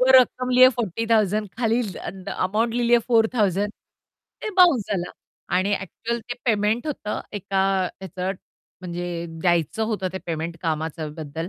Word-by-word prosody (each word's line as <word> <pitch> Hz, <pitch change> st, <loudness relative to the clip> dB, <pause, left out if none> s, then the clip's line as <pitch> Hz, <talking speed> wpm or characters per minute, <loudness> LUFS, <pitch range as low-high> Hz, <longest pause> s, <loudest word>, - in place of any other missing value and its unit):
वो 255 Hz, +1 st, +4 dB
रकम 255 Hz, 0 st, +1 dB
लिया 255 Hz, +1 st, +8 dB
40,000 215 Hz, -1 st, +1 dB
खाली 230 Hz, 0 st, +2 dB
ल 205 Hz, -5 st, -5 dB
अ, -, -, -9 dB
अन् 190 Hz, -1 st, -7 dB, 0.2 s
अमाउंट 220 Hz, +4 st, 0 dB
लिहिली 240 Hz, 0 st, +3 dB
आहे 240 Hz, -, +5 dB
4,000 215 Hz, -4 st, +2 dB, 0.7 s
ते 435 Hz, -, -2 dB
बाउन्स 340 Hz, -10 st, +6 dB
झाला 180 Hz, -2 st, -2 dB, 0.5 s
आणि 195 Hz, +2 st, +2 dB
ॲक्चुअल 235 Hz, +5 st, -4 dB
ते 245 Hz, -, -1 dB
पेमेंट 220 Hz, +2 st, +1 dB
होतं 265 Hz, -8 st, -3 dB, 0.2 s
एका 195 Hz, 0 st, 0 dB, 0.4 s
ह्याचं 185 Hz, 0 st, -3 dB, 0.5 s
म्हणजे 175 Hz, -1 st, -4 dB, 0.3 s
द्यायचं 175 Hz, +4 st, +1 dB
होतं 190 Hz, -3 st, -1 dB
ते 190 Hz, -, -3 dB
पेमेंट 165 Hz, 0 st, -3 dB
कामाच्याबद्दल 160 Hz, 0 st, -3 dB
205 Hz, 145 wpm, -24 LUFS, 175-235 Hz, 0.7 s, लिया